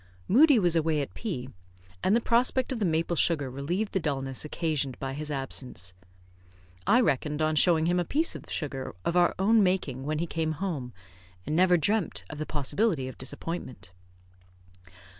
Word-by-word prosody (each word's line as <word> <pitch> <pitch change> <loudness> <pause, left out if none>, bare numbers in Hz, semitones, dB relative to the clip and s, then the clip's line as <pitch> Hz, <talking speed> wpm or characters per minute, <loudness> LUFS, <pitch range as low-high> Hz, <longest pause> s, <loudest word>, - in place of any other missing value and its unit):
Moodie 285 +5 +6
was 175 -5 +3
away 160 -1 +2
at 140 - -4
P, 160 - -4 0.6
and 200 - +3
the - - +4
prospect 250 +3 +2
of 250 - -2
the 210 - +1
maple 165 +1 0
sugar 145 -5 +2
relieved 170 +11 -2
the 190 - +2
dulness 135 -5 -2
occasioned 150 -4 -2
by 135 -1 -4
his 150 +2 -5
absence. 130 - -3 0.9
I 230 +5 +5
reckoned 150 - 0
on 155 0 +1
showing 160 0 +4
him 175 +1 +2
a - - +1
piece 310 - +2
of - - -10
sugar 135 - -4
of 170 - 0
our 175 -1 +4
own 215 +4 +4
making 180 -9 0
when 150 +2 -2
he 165 - -1
came 160 -1 -2
home, 155 -8 -4 0.5
and 150 - -2
never 180 +1 +5
dreamt 200 +3 0
of 150 - -8
the 155 - -3
possibility 150 - 0
of 130 - -9
disappointment. 130 - -6
160 Hz, 175 wpm, -28 LUFS, 140-190 Hz, 0.9 s, Moodie